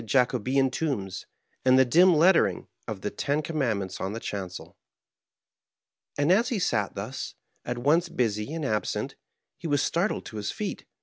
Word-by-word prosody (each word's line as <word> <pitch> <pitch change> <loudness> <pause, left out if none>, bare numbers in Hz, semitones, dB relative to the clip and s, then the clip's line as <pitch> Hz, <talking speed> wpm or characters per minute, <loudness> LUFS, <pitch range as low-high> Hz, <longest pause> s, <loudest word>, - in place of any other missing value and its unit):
Jacobean 130 +2 +2
tombs^ 100 - -3 0.4
and 130 0 +5
the 130 - +6
dim 175 +7 +6
lettering 170 +3 +4 0.2
of - - -5
the - - -3
ten 145 +2 -1
com 160 +1 -4
mandments 100 -8 -1
in 95 +2 -2
the 115 - -4
chancel. 95 -5 -6 1.4
And 145 +3 +3
as 225 +5 +4
he 235 - 0
sat 105 - 0
thus, 110 +7 -5 0.3
at 120 0 -3
once 160 +8 +2
busy 110 -5 -1
and 160 -2 -3
absent, 110 -4 -1 0.4
he 170 - -5
was 145 -2 +2
startled 180 +6 0
to 110 - -8
his 105 -1 -3
feet. - - -4
130 Hz, 165 wpm, -27 LUFS, 105-160 Hz, 1.4 s, the